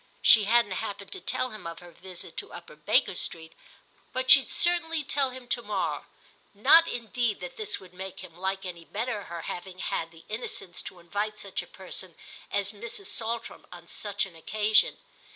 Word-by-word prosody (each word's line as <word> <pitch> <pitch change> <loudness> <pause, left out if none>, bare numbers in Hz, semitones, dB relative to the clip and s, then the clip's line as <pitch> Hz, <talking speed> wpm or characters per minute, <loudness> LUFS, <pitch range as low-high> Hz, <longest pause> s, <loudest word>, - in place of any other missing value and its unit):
She 215 -2 +8
hadn't 230 -1 +4
happened 200 0 -4
to - - -6
tell 255 +7 -1
him 215 -5 -8
of 165 0 -6
her 175 0 -12
visit 180 +1 -8
to - - -5
Upper - - -10
Baker - - +2
Street, 160 0 -3 0.6
but 255 0 +3
she'd 275 - +9
certainly 330 -3 +3
tell 275 -1 +1
him 255 -1 -10
to 240 - +1
morrow; 205 -4 -2 0.5
not 330 0 +7
indeed 235 -3 -1
that - - -7
this 435 -3 +1
would 185 -2 -15
make 190 0 -7
him 180 -3 -11
like 190 +2 -2
any 170 -2 -6
better 215 +3 -3
her 170 -1 -6
having 185 +1 -6
had 165 -3 -2
the 165 0 -17
innocence 215 -5 -3
to - - -8
invite 205 +5 -3
such 195 -2 -4
a - - -12
person 185 -2 -6 0.3
as 200 0 0
Mrs. 235 - -3
Saltram 230 +1 -2
on 175 -1 -11
such 205 +1 -1
an 185 -4 -12
occasion. 210 +5 +4
205 Hz, 185 wpm, -28 LUFS, 180-240 Hz, 0.6 s, she'd